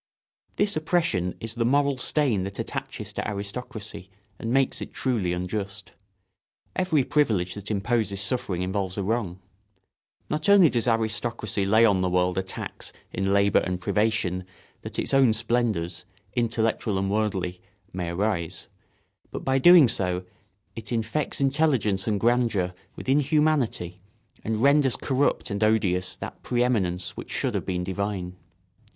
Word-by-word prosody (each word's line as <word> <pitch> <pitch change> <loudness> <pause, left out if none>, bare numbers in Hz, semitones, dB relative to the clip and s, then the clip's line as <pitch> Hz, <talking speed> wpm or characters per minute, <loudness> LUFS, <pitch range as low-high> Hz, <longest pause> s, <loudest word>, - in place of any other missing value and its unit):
This 205 0 +1
oppression 155 - 0
is 115 0 -4
the 115 0 -1
moral 140 +2 +2
stain 130 -12 +1
that 100 0 -6
attaches 125 -4 -5
to - - -3
aristocracy 105 -1 -6 0.3
and 115 - -4
makes 135 0 +1
it - - -8
truly 115 -9 0
unjust. 95 +3 -4 0.8
Every 170 -7 +2
privilege 105 -12 +1
that 105 +1 -7
imposes 105 -1 0
suffering 100 -3 -1
involves 95 0 -2
a 100 - -1
wrong. 100 -4 -2 0.9
Not 155 +6 -1
only 195 -6 +7
does 120 0 0
aristocracy 110 -3 -1
lay 110 +3 +5
on 100 -4 +3
the 90 - +1
world 90 0 +1
a - - +1
tax 95 - -5 0.2
in 95 +1 0
labour 100 0 +4
and 90 -1 -2
privation 100 -2 0 0.4
that - - -7
its - - -1
own 135 -4 +5
splendours, 110 -7 0 0.3
intellectual 115 -3 0
and 95 0 -1
worldly, 95 -4 -1 0.3
may 90 -2 -3
arise, 85 -2 -2 0.6
but - - -7
by 135 0 +2
so - - -6
doing 175 -5 +8 0.9
it 110 0 -8
infects 115 +6 -1
intelligence 135 -9 +1
and 105 -2 +1
grandeur 115 -6 +1 0.2
with - - -9
inhumanity 140 - +1 0.4
and 110 +1 -1
renders 140 -3 +4
corrupt 135 -3 0
and 100 +1 -1
odious 95 -5 +1
that - - -8
pre 120 -1 +1
eminence 95 -8 -1
which - - -8
should - - -1
have - - -3
been 90 -1 -1
divine. 95 -1 -3
110 Hz, 145 wpm, -26 LUFS, 95-125 Hz, 0.9 s, doing